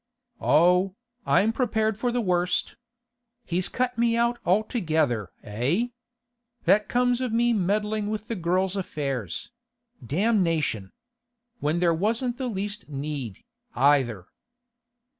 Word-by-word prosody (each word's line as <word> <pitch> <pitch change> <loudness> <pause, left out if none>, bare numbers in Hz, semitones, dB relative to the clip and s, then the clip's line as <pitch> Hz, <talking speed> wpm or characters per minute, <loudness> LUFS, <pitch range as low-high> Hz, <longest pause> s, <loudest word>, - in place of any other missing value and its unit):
'Oh, 180 +5 +4 0.3
I'm 220 +4 +3
prepared 220 -3 +1
for 240 +3 -1
the 245 0 0
worst. 180 -3 0 0.7
He's 180 +2 -1
cut 250 -1 -1
me 235 0 +3
out 235 0 +1
altogether, 160 - +1
eh? 135 - 0 0.7
That 210 -1 +3
comes 245 0 +2
of 255 -3 -1
me 235 +1 +3
meddling 210 +1 0
with 215 0 -4
the 230 - -3
girl's 185 +1 0
affairs—damnation! 175 - -2 0.7
When 150 +3 0
there 170 -1 +3
wasn't 230 +8 -1
the 260 - -2
least 205 -3 -4
need, 140 -7 -5 0.3
either. 125 -7 +3
195 Hz, 110 wpm, -26 LUFS, 155-235 Hz, 0.7 s, Oh